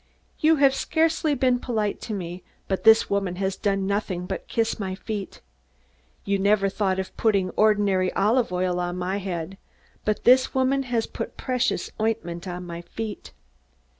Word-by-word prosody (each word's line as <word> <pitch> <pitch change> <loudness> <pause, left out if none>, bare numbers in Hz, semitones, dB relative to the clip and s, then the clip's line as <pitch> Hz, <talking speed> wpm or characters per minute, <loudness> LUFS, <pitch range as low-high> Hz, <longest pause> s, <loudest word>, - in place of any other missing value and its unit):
You 315 +1 +5
have 275 -2 +4
scarcely 320 +1 +1
been 255 -1 +2
polite 220 -5 -2
to 225 - -5
me; 180 -1 -6 0.3
but 190 - -2
this 220 0 +7
woman 195 -3 -1
has 190 +1 -1
done 195 -2 0
nothing 195 -3 -2
but - - -5
kiss 225 -1 -1
my 190 -2 -3
feet. 205 0 -6 0.8
You 200 0 +1
never 200 0 +3
thought 190 -2 0
of 190 0 -4
putting 200 -5 +2
ordinary 205 -4 +2
olive 225 +3 +2
oil 180 0 0
on 175 0 -2
my 185 +2 -2
head; 190 -1 -5 0.4
but 215 0 -1
this 255 +2 +5
woman 265 +1 +2
has 230 -2 +1
put - - -6
precious 255 0 -1
ointment 180 -5 -2
on 180 0 -5
my 170 -1 -6
feet. 215 +4 -7
200 Hz, 165 wpm, -25 LUFS, 185-230 Hz, 0.8 s, this